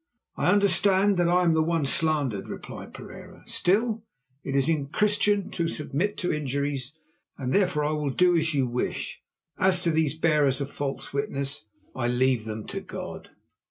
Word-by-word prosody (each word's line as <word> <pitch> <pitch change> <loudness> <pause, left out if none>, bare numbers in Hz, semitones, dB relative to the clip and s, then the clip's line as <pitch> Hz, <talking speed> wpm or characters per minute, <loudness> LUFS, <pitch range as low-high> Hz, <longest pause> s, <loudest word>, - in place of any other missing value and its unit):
"I - - 0
understand 200 0 +4
that 175 -1 +3
I 180 +1 +4
am 170 -2 +4
one 160 -1 +1
slandered," 140 -8 +1
replied - - -8
Pereira. - - -11
"Still, 215 +4 +1 0.4
it 135 - -3
is 135 -1 +2 0.2
Christian 205 0 +2
to 170 -1 -1
submit 165 +6 -2
to 180 - -1
injuries, 140 -2 -2 0.4
and 130 -2 -2
therefore 180 -7 +2
I 150 - 0
will 150 -2 -1
do 180 +6 +3
as 160 -2 +1
you 135 -2 +2
wish. 125 0 -3 0.4
As 185 -2 +3
to 170 - +2
these 155 -1 +1
bearers 150 -5 +2
of 140 0 -4
false 140 -1 -4
witness, 140 -4 -3 0.3
I 120 -2 -1
leave 125 -2 +2
them 110 -1 -5
to - - -3
God." - - -8
155 Hz, 160 wpm, -26 LUFS, 135-180 Hz, 0.4 s, understand